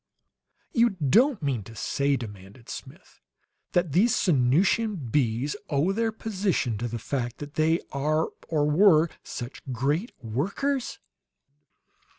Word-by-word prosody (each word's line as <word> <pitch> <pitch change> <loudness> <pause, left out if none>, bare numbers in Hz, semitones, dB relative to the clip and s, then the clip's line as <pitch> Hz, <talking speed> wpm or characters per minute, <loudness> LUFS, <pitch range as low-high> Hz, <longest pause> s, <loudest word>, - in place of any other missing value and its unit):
"You 235 0 +5
don't 215 - +3
mean 135 -6 0
to 115 +3 -12
say," 140 +5 0
demanded 105 0 -10
Smith, - - -10 0.5
"that 175 -3 +2
these 210 - +4
Sanusian 180 - +2
bees 130 - 0
owe 150 +5 +2
their 225 +2 0
position 195 - -1
to 120 - -2
the 120 0 -4
fact 120 0 -3
that 145 0 -8
they 160 +2 +2
are, 155 +3 0 0.2
or 150 -3 +1
were, 165 0 +5
such 120 +2 -7
great 145 - 0
workers?" 200 - -2
150 Hz, 125 wpm, -26 LUFS, 125-195 Hz, 0.5 s, You